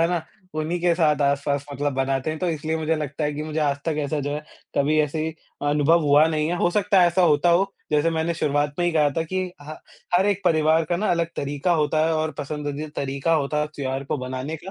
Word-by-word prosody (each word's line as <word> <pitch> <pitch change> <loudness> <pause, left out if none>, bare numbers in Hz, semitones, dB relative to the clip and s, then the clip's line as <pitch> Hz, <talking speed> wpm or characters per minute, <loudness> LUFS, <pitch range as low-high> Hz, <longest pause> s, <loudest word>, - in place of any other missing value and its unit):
है 165 - +3
ना, 175 -2 -1 0.3
उन्हीं 155 +3 -1
के 175 -1 +3
साथ 155 -4 +2
आस-पास 140 0 0
मतलब 145 +1 -1
बनाते 135 +2 0
हैं। 155 - -4
तो 180 - -1
इसलिए 160 0 -2
मुझे 160 0 0
लगता 150 0 -3
है 150 - 0
कि 150 - -4
मुझे 155 0 -4
आज 145 -2 +1
तक 160 -2 0
ऐसा 150 +1 -2
जो 145 +1 -3
है, 150 - -3 0.4
कभी 150 +2 +2
ऐसे 150 +1 -1
ही 160 - -2 0.3
अ, - - -1
अनुभव 150 +3 +4
हुआ 145 +2 +6
नहीं 155 -1 0
है। 175 - -1
हो 175 - +2
सकता 200 0 +3
है 175 - +6
ऐसा 175 +2 +2
होता 155 0 +4
हो 195 +3 +2 0.2
जैसे 150 +2 +2
मैंने 165 +1 -1
शुरुआत 145 -2 0
में 175 - +1
ही 175 - +1
कहा 150 -2 +3
था 165 - -1
कि 185 -1 -1
ह 155 +1 -8 0.4
हर 190 +3 +3
एक 200 -1 +1
परिवार 160 -1 +3
का 175 - -1
ना 210 +5 -1
अलग 170 -1 +1
तरीक़ा 145 +5 -1
होता 155 0 +2
है 165 - +1
और 155 0 0
पसंदीदा 150 +1 -4
तरीक़ा 140 +4 -1
होता 150 0 0
है 150 - 0
त्योहार 135 -1 -3
को 140 - -2
बनाने 130 +4 -4
का। 180 +5 -10
155 Hz, 255 wpm, -23 LUFS, 145-165 Hz, 0.4 s, हुआ